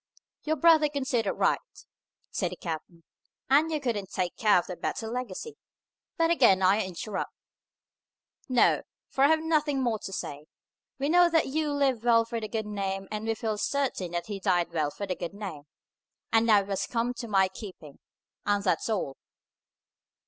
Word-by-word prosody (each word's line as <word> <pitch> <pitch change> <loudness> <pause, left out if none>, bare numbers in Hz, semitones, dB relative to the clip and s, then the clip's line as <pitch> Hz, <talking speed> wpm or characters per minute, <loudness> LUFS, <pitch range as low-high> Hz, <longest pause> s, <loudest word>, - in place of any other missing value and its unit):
"Your 310 +1 +1
brother 315 0 +5
considered 260 -7 -1
right," - - +2 0.7
said - - -1
the - - -5
captain; 165 0 -6 0.5
"and 305 +4 +5
you 310 - 0
couldn't 220 -8 -2
take 180 -2 -2
care 210 -4 +4
of 175 - 0
a 180 - -5
better 225 - -3
legacy. 250 - -5 0.6
But 330 0 +3
again 215 - +5
I 195 +4 +4
interrupt." 190 +3 -4 1.2
"No; 250 -2 +4 0.3
for 270 - +1
I - - +8
have 315 +1 +3
nothing 300 -3 +1
more 235 -4 0
to 195 - -7
say. 150 -5 -6 0.5
We 280 0 -1
know 350 +2 +5
that 325 -1 +3
Hugh 310 -1 0
lived 270 -5 +1
well 230 -1 +4
for 230 0 -3
the 215 - -4
good 220 -1 -3
name, 195 -2 -3
and 215 +1 -4
we 225 - +1
feel 215 -2 -2
certain 270 -11 -1
that 170 0 -2
he 205 -2 -5
died 175 -3 +1
well 155 -3 +1
for 200 - -5
the 190 - -2
good 175 +2 -6
name. 180 -8 -7 0.7
And 225 0 +4
now 210 -3 +6
it 200 - -9
has 195 0 -1
come 235 0 0
into 245 -1 -5
my 195 -3 +3
keeping. 185 -7 -11 0.4
And 205 -1 +1
that's 200 - 0
all." 180 -11 -2
220 Hz, 180 wpm, -28 LUFS, 190-270 Hz, 1.2 s, I